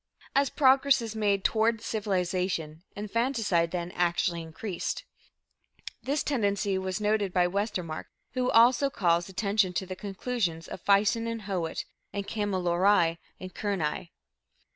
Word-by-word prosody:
As 275 0 +3
progress 275 -1 +4
is 225 -2 -5
made 200 -3 +1
toward 225 0 +2
civilization, 185 -7 -2
infanticide, 210 -5 0
then, 175 0 -4
actually 175 -1 0
increased. 170 - -4 1.0
This 285 +2 -1
tendency 200 -7 0
was 190 +1 -3
noted 210 -2 +1
by 180 -1 +3
Westermark, 180 -4 -2 0.3
who 255 0 0
also 245 +4 +5
calls 175 -6 +1
attention 200 -1 +1
to 190 - -2
the 185 0 -6
conclusions 195 -4 -3
of - - -8
Fison 210 +3 +3
and 230 -1 -4
Howitt 185 -5 -3 0.3
(in 200 - -2
Kamilaroi 185 -4 +2 0.2
and 185 -1 -8
Kurnai). 180 -5 -2
200 Hz, 125 wpm, -28 LUFS, 175-225 Hz, 1.0 s, also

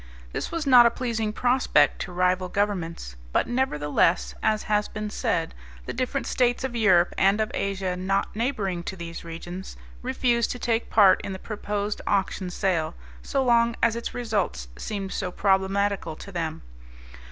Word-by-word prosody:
This - - -3
was 330 -2 -2
not 250 -3 +8
a - - +4
pleasing 230 -3 -2
prospect 245 - +2
to 185 - -5
rival 180 +1 +1
governments, 175 - -2 0.2
but - - +2
nevertheless, 170 - +1
as 215 -1 +1
has 210 0 +1
been 210 -1 -5
said, - - -1 0.3
the - - -4
different 260 +2 -2
States 245 0 +1
of 260 -2 -3
Europe 185 -6 +4
and 195 +2 +4
of 215 0 0
Asia 195 -2 -2
not 190 +3 -1
neighboring 210 -7 -1
to - - -4
these 170 -2 -7
regions, 175 +3 -8 0.2
refused 245 -2 +1
to - - -7
take 230 -1 -1
part 200 -4 +6
in 195 - -4
the - - -5
proposed 205 0 -3
auction 195 -2 0
sale 175 -4 -1 0.3
so 275 -1 0
long 235 -2 +3
as 230 -1 +4
its 235 - -4
results 205 - -2
seemed 195 - -4
so 180 - -3
problematical 195 -3 +1
to 200 - -10
them. 165 -3 -4
200 Hz, 165 wpm, -25 LUFS, 180-235 Hz, 0.3 s, not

